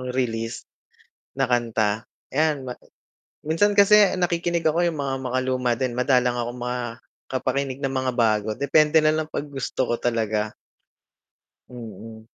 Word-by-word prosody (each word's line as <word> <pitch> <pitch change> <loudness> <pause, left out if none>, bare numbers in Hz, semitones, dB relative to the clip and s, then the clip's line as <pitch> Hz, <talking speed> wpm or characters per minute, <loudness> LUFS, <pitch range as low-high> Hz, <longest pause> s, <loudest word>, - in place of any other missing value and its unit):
release 115 -2 -2 0.7
na 135 - +1
kanta, 115 -3 0 0.3
ayan 150 -1 +1
ma 125 - -3 0.7
minsan 165 +7 +2
kasi 200 -1 +6
nakikinig 170 -1 0
ako 165 +3 +3
yung 160 - -6
mga 135 -1 -1
makaluma 130 -1 0
din, 130 -2 -1
madalang 125 -1 +3
akong 120 +1 -3
makapakinig 125 +2 -4
ng 135 0 -1
mga 130 -1 0
bago, 110 -2 +2
depende 150 +2 +3
nalang 155 0 +1
'pag 150 - -4
gusto 135 -1 -2
ko 120 - +2
talaga. 110 -3 -1 1.1
Mm. 110 -2 -10
130 Hz, 125 wpm, -24 LUFS, 120-150 Hz, 1.1 s, kasi